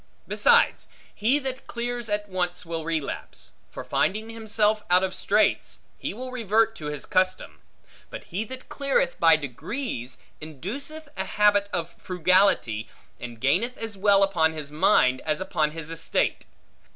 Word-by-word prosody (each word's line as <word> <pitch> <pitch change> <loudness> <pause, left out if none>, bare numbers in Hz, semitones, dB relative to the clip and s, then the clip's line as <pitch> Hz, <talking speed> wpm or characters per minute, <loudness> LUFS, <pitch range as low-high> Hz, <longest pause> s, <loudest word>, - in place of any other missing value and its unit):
Besides, 475 -1 +3 0.3
he 235 +7 +2
that 265 -2 -4
clears 240 -1 -4
at 205 0 -1
once 180 -2 -2
will 165 -1 -4
relapse; 160 -3 -4 0.2
for - - -8
finding 220 +3 0
himself 215 -1 +1
out 180 +1 +5
of 190 0 -1
straits, - - +1
he - - -4
will 255 +5 -7
revert 225 -2 +1
to 150 - -6
his 150 -1 -4
custom: 185 - 0 0.5
but - - -8
he 190 +5 -3
that 260 +3 -9
cleareth 275 -1 0
by 165 -1 +7
degrees, 145 - -5 0.2
induceth 270 - -7
a 190 - -2
habit 205 0 +3
of 170 -1 -3
frugality, 180 - +2 0.3
and 120 -2 -8
gaineth 185 - +1
as 225 -2 -5
well 200 0 +4
upon 160 -5 +2
his 150 -2 -6
mind, 130 -4 +3
as 155 0 -1
upon 155 -5 0
his 160 0 -7
estate. 165 0 -1
190 Hz, 150 wpm, -25 LUFS, 160-225 Hz, 0.5 s, by